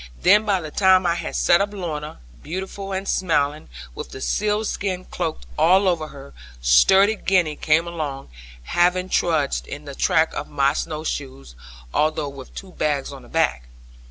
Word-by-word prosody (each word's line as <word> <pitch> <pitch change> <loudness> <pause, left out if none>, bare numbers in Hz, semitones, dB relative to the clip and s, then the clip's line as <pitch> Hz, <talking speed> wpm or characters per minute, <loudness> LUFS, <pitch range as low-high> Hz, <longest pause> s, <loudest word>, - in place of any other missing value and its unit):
Then 210 +4 +5
by 200 -3 +2
the 155 -2 -7
time 190 0 +4
I 170 - +3
had 175 - -5
set 175 - +4
up 200 0 -1
Lorna, 155 - -5 0.2
beautiful 190 +3 -6
and 190 +1 -3
smiling, 150 - 0 0.2
with - - -7
the - - -9
seal 210 +8 0
skin 185 -3 -3
cloak 165 - -4 0.2
all 190 +3 +5
over 165 -4 0
her, 140 -1 -12 0.3
sturdy 190 - +5
Gwenny 180 -7 +1
came 155 +3 +2
along, 150 -5 -5 0.3
having 180 - +1
trudged 155 -7 0
in 145 +1 -8
the 140 - -7
track 160 +3 +2
of - - -4
my 140 -1 +2
snow 155 0 -4
shoes, 130 - -5 0.4
although 155 -1 0
with 140 -2 -12
two 190 -1 -9
bags 145 -4 -2
on 135 - -10
her 120 - -16
back. 110 - 0
165 Hz, 170 wpm, -22 LUFS, 145-185 Hz, 0.4 s, Then